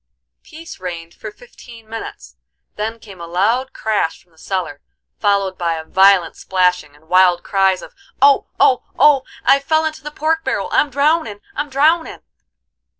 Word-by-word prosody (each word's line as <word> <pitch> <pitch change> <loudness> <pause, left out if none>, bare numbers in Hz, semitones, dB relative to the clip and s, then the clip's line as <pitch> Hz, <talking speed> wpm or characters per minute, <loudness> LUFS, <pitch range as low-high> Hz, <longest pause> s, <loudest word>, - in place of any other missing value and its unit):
Peace 325 +1 -12
reigned 170 -2 -7
for - - -9
fifteen 245 - -16
minutes; 225 +1 -9 0.4
then 220 +2 -4
came 200 -5 -13
a 170 - -7
loud 225 +10 0
crash 215 -7 -2
from 175 - -36
the 160 - -29
cellar, 180 -7 -4 0.4
followed 200 -2 0
by 170 -2 0
a 160 - -6
violent 190 -1 +4
splashing, 180 -5 0
and 155 +2 -24
wild 180 0 +4
cries 195 -1 +1
of, - - -12 0.3
"Oh, 280 0 +4
oh, 255 - +4 0.2
oh, 290 -3 +5 0.2
I've 275 +1 +4
fell 315 +2 +1
into 315 -1 -4
the 300 - -7
pork 320 +2 -1
barrel! - - -2
I'm 295 - +2
drownin', 280 -6 0
I'm 295 +1 -3
drownin'!" 310 +5 +1
210 Hz, 160 wpm, -18 LUFS, 180-285 Hz, 0.4 s, oh